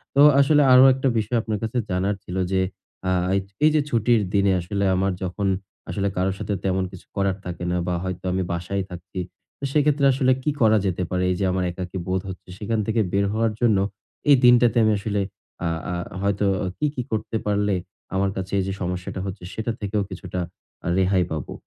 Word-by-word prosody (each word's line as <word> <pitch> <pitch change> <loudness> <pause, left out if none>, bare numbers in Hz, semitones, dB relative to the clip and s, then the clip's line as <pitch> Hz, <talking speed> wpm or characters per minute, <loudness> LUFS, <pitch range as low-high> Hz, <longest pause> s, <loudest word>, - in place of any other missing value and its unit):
তো 140 - +6 0.2
আসলে 145 +2 +5
আরো 125 +1 +9
একটা 135 +1 -1
বিষয় 110 +2 0
আপনার 110 -1 -2
কাছে 115 +3 -2
জানার 95 +3 0
ছিল 90 - -7 0.2
যে, 95 -1 +2 0.5
আ - - +2 0.2
এইযে 100 0 -2
এইযে 155 -1 +4
ছুটির 115 -2 +3
দিনে 100 -1 +3
আসলে 100 +3 -2
আমার 95 +1 +1
যখন 95 +2 -2 0.4
আসলে 100 -1 -1
কারো 95 +1 +2
সাথে 105 - -2
তেমন 95 0 +1
কিছু 95 - -12
করার 100 -1 0
থাকে 90 -1 -5
না 90 - +1
বা 90 - 0
হয়তো 95 -1 -4
আমি 95 +1 0
বাসায় 90 +3 -2
থাকছি, 90 +1 -8 0.4
তো - - -14
সেক্ষেত্রে 145 -1 +3
আসলে 130 0 +2
কি 150 - +1
করা 110 -1 +5
যেতে 90 -1 0
পারে? 90 0 0
এই - - 0
যে 100 - +1
আমার 90 0 0
একাকী 90 +1 -6
বোধ 95 0 0
হচ্ছে 95 - -9
সেখান 110 +2 -1
থেকে 110 0 +2
বের 100 0 +3
হওয়ার 110 0 +1
জন্য 115 -4 +4 0.5
এই 145 - +9
দিনটাতে 120 0 +6
আমি 110 - +4
আসলে 100 0 -1 0.4
আ - - +1 0.3
আ - - -1 0.3
হয়তো 100 +1 +1 0.3
কি, 150 - 0
কি 125 - -1
করতে 110 +1 -1
পারলে 105 -1 +1 0.4
আমার 95 +1 +2
কাছে 95 0 -4
এইযে 95 0 -1
সমস্যাটা 90 +1 -3
হচ্ছে 95 -2 -6
সেটার 110 +1 -3
থেকেও 105 0 -1
কিছুটা 90 -2 -5 0.5
আ - - -2
রেহাই 95 -1 +3
পাবো? 75 -5 -4
100 Hz, 195 wpm, -23 LUFS, 95-110 Hz, 0.5 s, আরো